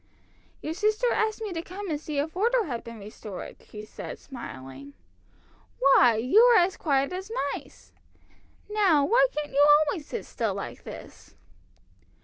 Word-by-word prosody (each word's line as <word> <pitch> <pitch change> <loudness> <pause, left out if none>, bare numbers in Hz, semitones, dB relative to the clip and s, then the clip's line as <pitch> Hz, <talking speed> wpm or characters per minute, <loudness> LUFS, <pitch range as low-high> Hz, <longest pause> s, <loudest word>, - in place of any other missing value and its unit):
"Your 310 - -3
sister 430 +6 +1
asked 440 0 -1
me 415 -4 -4
to 330 - -3
come 385 +4 -8
and 295 -1 -2
see 305 -2 -5
if 310 +4 -2
order 465 +5 +2
had 245 - -5
been 230 -1 -9
restored," 205 -2 -9
she 210 0 -9
said, - - -8
smiling. 140 - -10 0.8
"Why, 255 -3 +5
you 250 - +4
are 480 -1 +7
as 360 +2 +2
quiet 275 0 0
as 380 +2 -6 0.2
mice! - - -11 0.7
Now, 385 -9 +3
why - - +4
can't 300 -6 -4
you 285 +1 +5 0.2
always 290 0 -4
sit 470 - -5
still - - -2
like - - -7
this?" - - -11
310 Hz, 155 wpm, -27 LUFS, 250-420 Hz, 0.8 s, are